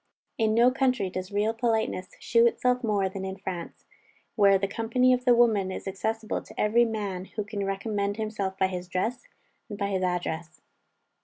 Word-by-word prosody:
In 220 -1 +2
no 240 +2 +6
country 255 -7 +1
does 185 +1 -5
real 210 +2 +1
politeness 225 -5 -1
shew 235 0 +4
itself 250 +1 +1
more 205 -4 +1
than 190 0 -6
in 190 0 -5
France, 180 -3 -7 0.5
where 200 -2 +5
the 195 +1 -1
company 240 +5 +2
of 250 0 -1
the 245 -2 +6
women 215 -6 +3
is 190 - -6
accessible 220 +3 -2
to - - -13
every 230 +3 +4
man 205 -5 -3
who 210 - -5
can 205 -1 -4
recommend 200 +1 -2
himself 210 -3 -3
by 190 - +3
his 180 -1 -4
dress, 215 +8 -2 0.4
and 205 - -6
by 200 -1 -1
his 190 -2 -1
address. 175 -2 -2
205 Hz, 180 wpm, -27 LUFS, 190-230 Hz, 0.5 s, no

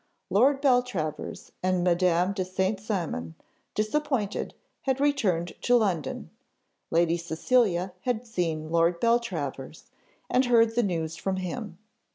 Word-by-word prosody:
Lord 270 +7 +4
Beltravers 245 - 0
and 185 -1 +1
Madame 180 +1 +2
de 195 -2 -1
St. 190 +2 -1
Cymon, 170 - -3 0.4
disappointed, 215 -1 -1 0.3
had 265 -1 0
returned 210 - +1
to 245 - +3
London; 195 -9 0 0.6
Lady 170 0 +2
Cecilia 180 +2 +1
had 245 +1 -1
seen 165 -8 -2
Lord 170 +1 +3
Beltravers, 170 - -1 0.4
and 255 +1 +2
heard 230 -2 +4
the 240 - +2
news 165 -6 -2
from 190 -1 -2
him. 185 +1 -5
190 Hz, 120 wpm, -27 LUFS, 170-235 Hz, 0.6 s, Lord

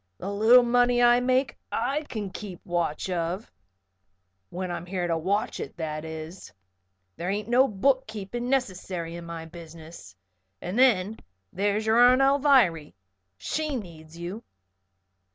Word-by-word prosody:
"The 195 - -5
little 225 +5 +6
money 245 0 +3
I 240 0 +6
make 255 +2 0
I 270 +6 -1
kin 210 -5 -5
keep 190 -3 -9
watch 175 -2 -2
of 175 +4 -3 1.0
when 180 0 -4
I'm 175 0 -5
here 180 -1 -2
to 170 -1 0
watch 195 +6 -1
it, - - -7
that 155 -1 -4
is. 160 +3 -8 0.7
There 175 - -3
ain't 205 +1 -2
no 250 +3 +4
book 260 +5 +1
keeping 220 +3 -5
necessary 185 -9 -2
in 170 0 -8
my 165 -1 -6
business. 165 - -12 0.4
And 185 +7 -3
then 220 -5 +3 0.3
there's 205 +3 0
your 220 +2 +3
Aunt 250 +1 +6
Alviry. 265 - +3 0.4
She 305 - -3
needs 165 -7 -9
you." 180 +7 -6
195 Hz, 140 wpm, -26 LUFS, 170-245 Hz, 1.0 s, little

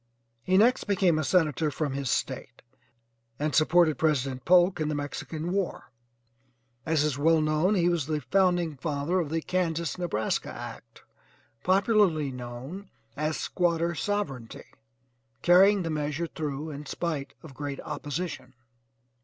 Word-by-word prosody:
He 185 +8 +2
next 235 +5 +4
became 190 -5 +2
a - - 0
Senator 155 -3 +2
from 145 -1 -2
his 135 -2 -3
State, - - -3 0.7
and 150 0 -1
supported 160 0 +4
President 135 -5 0
Polk 180 0 +5
in 155 - 0
the 150 - -1
Mexican 155 +3 -4
war. 195 -1 -3 1.0
As 160 -2 +2
is 145 -2 -1
well 160 +2 +4
known 155 +6 +2
he 175 -2 +2
was 170 -5 0
the 155 -1 -1 0.6
father 150 +5 0
of 165 -5 -2
the 160 0 -2
Kansas 170 -2 -1
Nebraska 135 -12 -1
act, - - -10 0.6
popularly 185 - +3
known 130 +10 -8 0.3
as 155 +1 -1
'Squatter 170 -1 0
Sovereignty,' 150 - -4 0.7
carrying 190 +2 +6
the 165 - -2
measure 150 +2 -2
through 155 -1 -4
in 145 0 -8
spite 155 -4 -3
of 155 -4 -11
great 140 0 -5
opposition. 145 -4 -5
160 Hz, 135 wpm, -27 LUFS, 145-175 Hz, 1.0 s, carrying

